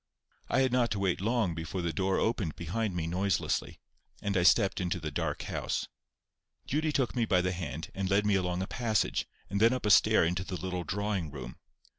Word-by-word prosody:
I -, -, +3 dB
had 130 Hz, -1 st, +2 dB
not 125 Hz, -1 st, +2 dB
to 100 Hz, -, -3 dB
wait 95 Hz, -2 st, 0 dB
long 110 Hz, -4 st, +1 dB
before 80 Hz, +3 st, -4 dB
the 85 Hz, -1 st, -1 dB
door 95 Hz, +4 st, +1 dB
opened 105 Hz, -8 st, 0 dB
behind 95 Hz, +4 st, -2 dB
me 85 Hz, -2 st, -1 dB
noiselessly, 90 Hz, +1 st, -1 dB, 0.4 s
and 100 Hz, 0 st, -2 dB
I 90 Hz, -, +3 dB
stepped 95 Hz, +2 st, +4 dB
into 90 Hz, -1 st, -1 dB
the 80 Hz, -2 st, -4 dB
dark -, -, -2 dB
house. -, -, -2 dB, 0.8 s
Judy 155 Hz, +3 st, 0 dB
took 130 Hz, -4 st, 0 dB
me 120 Hz, -2 st, +2 dB
by 90 Hz, -4 st, +3 dB
the 90 Hz, 0 st, 0 dB
hand, 80 Hz, -3 st, -5 dB
and 95 Hz, -1 st, -2 dB
led 100 Hz, +1 st, +3 dB
me 105 Hz, -, +3 dB
along 90 Hz, -1 st, 0 dB
a -, -, -4 dB
passage, 110 Hz, -4 st, 0 dB, 0.2 s
and 100 Hz, +2 st, -2 dB
then 115 Hz, +2 st, +6 dB
up 130 Hz, -, -3 dB
a 105 Hz, -, +3 dB
stair 100 Hz, -, +6 dB
into 90 Hz, +2 st, -1 dB
the 95 Hz, -1 st, -5 dB
little 90 Hz, -1 st, -3 dB
drawing 100 Hz, -1 st, -2 dB
room. 65 Hz, -4 st, -8 dB
95 Hz, 210 wpm, -30 LUFS, 90-105 Hz, 0.8 s, then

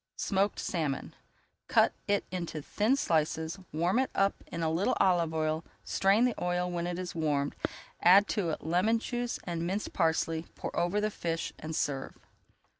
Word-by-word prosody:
SMOKED 200 Hz, 0 st, +1 dB
SALMON 150 Hz, -6 st, -2 dB, 0.5 s
Cut -, -, +4 dB
it 205 Hz, 0 st, +1 dB
into 170 Hz, -4 st, -3 dB
thin 215 Hz, -, +2 dB
slices, 160 Hz, -, 0 dB
warm 175 Hz, -, +1 dB
it 265 Hz, -, +1 dB
up 195 Hz, 0 st, +1 dB
in 165 Hz, -, -4 dB
a 160 Hz, -, +1 dB
little 170 Hz, +5 st, +1 dB
olive 175 Hz, -4 st, +3 dB
oil, 155 Hz, 0 st, 0 dB, 0.2 s
strain 200 Hz, +5 st, +3 dB
the 250 Hz, -, +2 dB
oil 180 Hz, 0 st, 0 dB
when 175 Hz, 0 st, -2 dB
it 175 Hz, 0 st, -3 dB
is 180 Hz, -1 st, -4 dB
warmed, 145 Hz, -3 st, 0 dB, 0.5 s
add 195 Hz, +4 st, +7 dB
to 200 Hz, -7 st, 0 dB
it 155 Hz, -, -3 dB
lemon 180 Hz, +8 st, +2 dB
juice 240 Hz, +1 st, -3 dB
and 170 Hz, -1 st, -3 dB
minced 200 Hz, +4 st, -2 dB
parsley, 165 Hz, -1 st, +1 dB
pour -, -, -5 dB
over 175 Hz, +4 st, +1 dB
the 215 Hz, +1 st, 0 dB
fish, 165 Hz, -4 st, -3 dB
and 155 Hz, +1 st, -5 dB
serve. 135 Hz, -3 st, -2 dB
175 Hz, 170 wpm, -30 LUFS, 160-200 Hz, 0.5 s, add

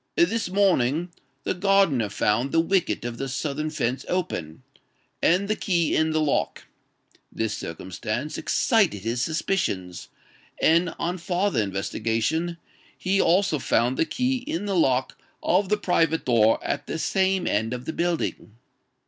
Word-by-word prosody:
This 205 Hz, +3 st, +2 dB
morning, 175 Hz, -4 st, +2 dB, 0.3 s
the -, -, -1 dB
gardener 185 Hz, -, +2 dB
found 105 Hz, +6 st, 0 dB
the 165 Hz, -, +3 dB
wicket 175 Hz, -5 st, +1 dB
of 120 Hz, -1 st, -5 dB
the 135 Hz, -, -3 dB
southern 150 Hz, +3 st, -2 dB
fence 135 Hz, -4 st, -2 dB
open, 85 Hz, -, -3 dB, 0.6 s
and 185 Hz, +4 st, +3 dB
the 215 Hz, -, +1 dB
key 170 Hz, -6 st, 0 dB
in 160 Hz, 0 st, +2 dB
the 155 Hz, 0 st, +1 dB
lock: 150 Hz, -2 st, 0 dB, 0.7 s
this 110 Hz, -1 st, -2 dB
circumstance 95 Hz, -, -5 dB
excited 195 Hz, -, +1 dB
his 115 Hz, +2 st, -1 dB
suspicions; 130 Hz, -, -2 dB, 0.5 s
and, 165 Hz, +1 st, +3 dB
on 175 Hz, +2 st, -2 dB
farther 175 Hz, -, 0 dB
investigation, 115 Hz, -, -1 dB, 0.4 s
he 195 Hz, +1 st, +1 dB
also 175 Hz, -3 st, +2 dB
found 120 Hz, 0 st, +1 dB
the 165 Hz, -, +1 dB
key 255 Hz, +6 st, 0 dB
in 205 Hz, -7 st, -4 dB
the 200 Hz, -1 st, -1 dB
lock 130 Hz, -6 st, +1 dB, 0.2 s
of 185 Hz, +2 st, +2 dB
the 210 Hz, -, +2 dB
private 165 Hz, -4 st, +1 dB
door 115 Hz, -3 st, +4 dB
at 145 Hz, 0 st, -3 dB
the -, -, -3 dB
same 190 Hz, +2 st, +1 dB
end 110 Hz, +2 st, 0 dB
of 125 Hz, 0 st, -5 dB
the 160 Hz, -, -3 dB
building. 170 Hz, -10 st, -2 dB
160 Hz, 145 wpm, -25 LUFS, 120-185 Hz, 0.7 s, door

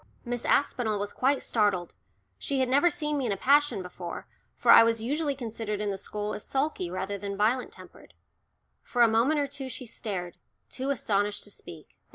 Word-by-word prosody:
Miss 245 Hz, 0 st, -3 dB
Aspinall 240 Hz, -6 st, +1 dB
was 205 Hz, 0 st, -4 dB
quite 270 Hz, +1 st, +1 dB
startled; 205 Hz, -6 st, +1 dB, 0.5 s
she 275 Hz, -2 st, -1 dB
had 260 Hz, -, +2 dB
never 285 Hz, +7 st, +4 dB
seen 300 Hz, -3 st, -1 dB
me 260 Hz, -, -1 dB
in -, -, -1 dB
a 195 Hz, -, -1 dB
passion 285 Hz, -4 st, +3 dB
before, 180 Hz, -1 st, -7 dB, 0.3 s
for -, -, +4 dB
I -, -, +10 dB
was 230 Hz, 0 st, +3 dB
usually 290 Hz, +3 st, -1 dB
considered 225 Hz, -4 st, -4 dB
in 210 Hz, -1 st, -1 dB
the -, -, -2 dB
school 210 Hz, +2 st, -4 dB
as -, -, -6 dB
sulky 270 Hz, -, -1 dB
rather 190 Hz, +2 st, -4 dB
than 200 Hz, 0 st, -5 dB
violent 230 Hz, +5 st, +1 dB
tempered. -, -, -15 dB, 0.7 s
For 245 Hz, -1 st, +2 dB
a -, -, +7 dB
moment 235 Hz, +8 st, +2 dB
or 285 Hz, -, 0 dB
two 270 Hz, -1 st, -7 dB
she 250 Hz, +1 st, -5 dB
stared, 190 Hz, -6 st, -4 dB, 0.3 s
too 265 Hz, +1 st, -3 dB
astonished 205 Hz, -6 st, 0 dB
to 205 Hz, -, -7 dB
speak. 165 Hz, -5 st, -11 dB
230 Hz, 195 wpm, -28 LUFS, 205-270 Hz, 0.7 s, I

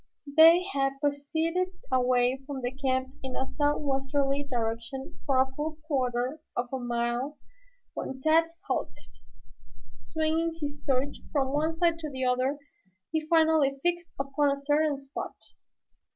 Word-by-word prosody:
They 330 Hz, +3 st, +8 dB
had 275 Hz, 0 st, 0 dB
proceeded 320 Hz, +6 st, 0 dB, 0.2 s
away 250 Hz, 0 st, +3 dB
from 280 Hz, -2 st, -4 dB
the 245 Hz, -, 0 dB
camp 260 Hz, -1 st, -1 dB
in 260 Hz, -1 st, -5 dB
a 265 Hz, -, 0 dB
southwesterly 280 Hz, -1 st, 0 dB
direction 240 Hz, +3 st, -3 dB
for 270 Hz, -2 st, +3 dB
a 265 Hz, 0 st, +3 dB
full 305 Hz, +2 st, -3 dB
quarter 260 Hz, 0 st, -1 dB, 0.2 s
of 245 Hz, 0 st, -1 dB
a 265 Hz, -, -1 dB
mile 240 Hz, +3 st, -1 dB, 0.6 s
when 265 Hz, -, -5 dB
Tad 315 Hz, +4 st, +4 dB, 0.2 s
halted. -, -, -1 dB, 1.1 s
Swinging 320 Hz, +1 st, 0 dB
his 290 Hz, -1 st, -4 dB
torch 270 Hz, +2 st, +1 dB
from 270 Hz, -2 st, +1 dB
one 315 Hz, +2 st, 0 dB
side 335 Hz, -1 st, +2 dB
to 310 Hz, -2 st, -4 dB
the 260 Hz, -2 st, -3 dB
other 255 Hz, +3 st, +1 dB, 0.5 s
he 315 Hz, -1 st, -1 dB
finally 315 Hz, -4 st, +4 dB
fixed 345 Hz, 0 st, 0 dB
upon 275 Hz, +1 st, +1 dB
a 280 Hz, -, 0 dB
certain 290 Hz, +1 st, +1 dB
spot. 275 Hz, +1 st, -6 dB
280 Hz, 135 wpm, -28 LUFS, 260-315 Hz, 1.1 s, They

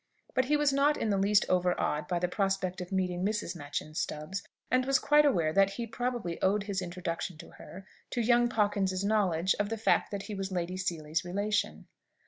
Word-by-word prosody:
But 255 Hz, -1 st, +2 dB
he 300 Hz, +3 st, +2 dB
was 295 Hz, -1 st, +2 dB
not 285 Hz, +2 st, +3 dB
in 220 Hz, -, 0 dB
the 200 Hz, -, +2 dB
least 200 Hz, +1 st, +4 dB
overawed 180 Hz, -4 st, +1 dB
by 175 Hz, -, 0 dB
the 180 Hz, +1 st, 0 dB
prospect 190 Hz, -1 st, -1 dB
of 180 Hz, -, -7 dB
meeting 180 Hz, -2 st, -1 dB
Mrs. 210 Hz, -1 st, -1 dB
Machyn 150 Hz, 0 st, -5 dB
Stubbs, 155 Hz, +6 st, -3 dB, 0.3 s
and 255 Hz, 0 st, +3 dB
was 270 Hz, +1 st, +3 dB
quite 295 Hz, +3 st, +4 dB
aware 165 Hz, -, +1 dB
that 195 Hz, +1 st, +4 dB
he 235 Hz, +3 st, -4 dB
probably 230 Hz, -6 st, -3 dB
owed 200 Hz, +2 st, +2 dB
his 200 Hz, -2 st, -2 dB
introduction 175 Hz, -1 st, -4 dB
to -, -, -12 dB
her, 190 Hz, +1 st, -11 dB, 0.2 s
to 245 Hz, -, -3 dB
young 240 Hz, +1 st, +4 dB
Pawkins's 200 Hz, -4 st, 0 dB
knowledge 190 Hz, -4 st, +2 dB
of 205 Hz, 0 st, 0 dB
the 225 Hz, -, -2 dB
fact 220 Hz, -, +2 dB
that 200 Hz, -1 st, -4 dB
he 215 Hz, -, -6 dB
was 195 Hz, -1 st, -4 dB
Lady 180 Hz, 0 st, -2 dB
Seely's 165 Hz, -4 st, -2 dB
relation. 205 Hz, +4 st, -1 dB
195 Hz, 200 wpm, -30 LUFS, 180-220 Hz, 0.3 s, least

